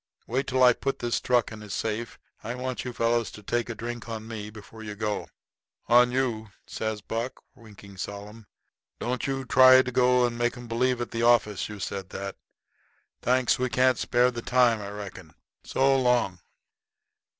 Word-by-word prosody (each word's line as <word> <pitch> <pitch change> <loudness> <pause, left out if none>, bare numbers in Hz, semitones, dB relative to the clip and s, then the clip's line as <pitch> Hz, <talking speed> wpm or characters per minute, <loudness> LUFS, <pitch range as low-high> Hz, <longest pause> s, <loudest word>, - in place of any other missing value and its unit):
Wait 130 +4 -1
till 130 0 +2
I 125 -1 +8
put 135 +3 -3
this 120 -2 -1
truck 125 -3 +2
in 110 -1 -9
his 105 -2 -6
safe. 110 +1 -3 0.3
I 115 - -4
want 130 0 -4
you 125 - -4
fellows 115 -1 +1
to 105 - -11
take 120 +3 -1
a 120 - -4
drink 120 +1 -6
on 110 -1 -6
me 105 -2 -6
before 110 +1 -12
you 105 -1 -6
go." 105 0 -2 0.6
"On 120 +1 +5
you?" 120 -4 -1 0.2
says 110 -1 -4
Buck, 115 +5 -4
winking 105 -5 -15
solemn. 105 +3 -7 0.5
"Don't 125 +3 -2
you 135 - 0
go - - -4
and 130 - -12
try 130 0 +8
to 125 -1 +3
make 120 +1 -1
'em 120 -1 -9
believe 125 +1 0
at 120 - -4
the 115 - -2
office 115 -5 +3
you 105 -1 -8
said 95 0 -5
that. 100 0 -6 0.9
Thanks. 130 +1 +2
We 130 0 0
can't 130 +2 +3
spare 125 +1 +2
the 120 -1 -5
time, 120 -3 +3
I 100 - -6
reckon. 95 -5 -9 0.3
So 135 +1 +2
long." 120 -8 +1
120 Hz, 185 wpm, -27 LUFS, 105-125 Hz, 0.9 s, I